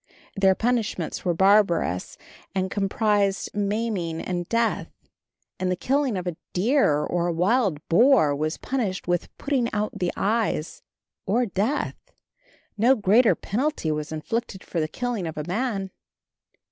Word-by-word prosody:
Their 195 -2 +4
punishments 225 -7 -1
were 175 -2 0
barbarous, 190 - +2 0.4
and 190 -1 -1
comprised 200 -1 0
maiming 205 -5 -1
and 175 -2 -3
death, 230 0 0 0.7
and 185 - 0
the - - +1
killing 265 +2 0
of 180 - -4
a 175 -3 -3 0.2
deer 185 - +2
or 175 0 -1
a - - +1
wild 180 - +1
boar 220 - +5
was 155 +3 -2
punished 215 -11 -3
with 175 -1 0
putting 265 -5 0
out 210 0 -1
the 180 -1 0
eyes 210 -7 -1 0.5
or 235 +6 +2
death. 220 +8 -1 0.8
No 245 +5 +5
greater 220 +2 +4
penalty 245 - -1
was 150 0 -3
inflicted 190 +5 -4
for 170 - -3
the 155 - 0
killing 230 +1 -3
of 160 - -6
a 150 - -2
man. 195 -1 -2
195 Hz, 140 wpm, -25 LUFS, 175-230 Hz, 0.8 s, boar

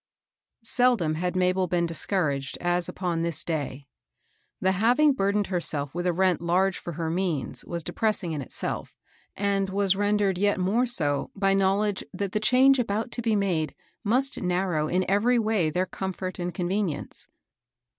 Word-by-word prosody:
ELDOM 235 -11 +3
had 180 +1 -2
Mabel 185 0 +2
been 175 0 +1
discouraged 155 -6 -1
as 175 0 0
upon 175 -3 -2
this 165 -2 -1
day. 145 -4 -4 0.7
The 190 - +2
having 245 +10 +4
burdened 200 -3 +1
II - - -12
herself 150 -6 +1
with 175 +2 -2
a - - +3
rent 185 0 +1
large 180 +3 +1
for 175 - -6
her 160 0 -3
means 170 -5 -1
was 170 -1 -4
depressing 210 -2 -1
in 150 -2 -3
itself, 130 - -5 0.4
and 195 -1 0
was 195 0 +1
rendered 205 -2 +1
yet 205 -1 +2
more 215 +7 +1
so 145 - +1
by 195 -1 +2
knowledge 195 +1 +1
that 195 0 -3
the 215 - 0
change 255 +5 +5
about 225 0 -1
to 240 - -2
be 225 -2 +1
made 180 -6 0 0.3
must 255 +6 0
narrow 180 -4 0
in 180 +3 0
every 220 +6 +3
way 215 -7 +1
their 180 +4 0
comfort 185 -1 -5
and 175 0 -2
convenience. 180 -3 -3
185 Hz, 165 wpm, -26 LUFS, 170-205 Hz, 0.7 s, change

